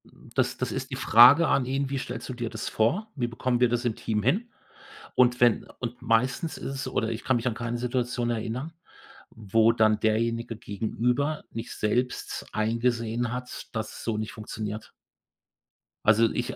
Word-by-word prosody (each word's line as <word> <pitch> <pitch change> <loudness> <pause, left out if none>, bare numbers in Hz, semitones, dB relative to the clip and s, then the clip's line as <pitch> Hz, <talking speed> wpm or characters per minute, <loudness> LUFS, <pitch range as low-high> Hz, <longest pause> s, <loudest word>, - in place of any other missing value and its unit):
Hm, - - -18
das - - +1
das - - -2
ist - - -4
die - - -2
Frage 125 +9 +7
an 130 - +2
ihn: 135 +1 -1
„Wie 140 - -2
stellst - - -6
du - - -3
dir 120 -2 -4
das - - -5
vor? 180 - 0
Wie 125 -4 -1
bekommen 120 +1 -1
wir 125 -1 +4
das 120 +1 -1
im 115 -3 0
Team 105 -2 -2
hin?“ 200 - +1 0.7
Und 125 -1 +4
wenn 120 -2 +4
und 120 0 -5
meistens 125 +7 +1
ist 135 - -5
es 135 - -4
oder 110 - -1
ich 115 0 -4
kann 130 - +2
mich 120 +1 -1
an 120 - +1
keine 120 +1 -3
Situation 125 0 -1
erinnern, 120 +7 -3 0.6
wo 110 +1 +3
dann 110 -2 +3
Derjenige 115 +1 0
gegenüber 120 +8 -1
nicht 115 +1 -6
selbst 125 +4 -1
eingesehen 115 +1 0
hat, 125 0 -6
dass 110 -1 -3
es - - -9
so 115 -2 -1
nicht 110 0 -4
funktioniert. 110 0 -6 1.1
Also, 110 +1 +5
ich 120 - -2
äh, - - -9
120 Hz, 185 wpm, -27 LUFS, 110-125 Hz, 1.1 s, Frage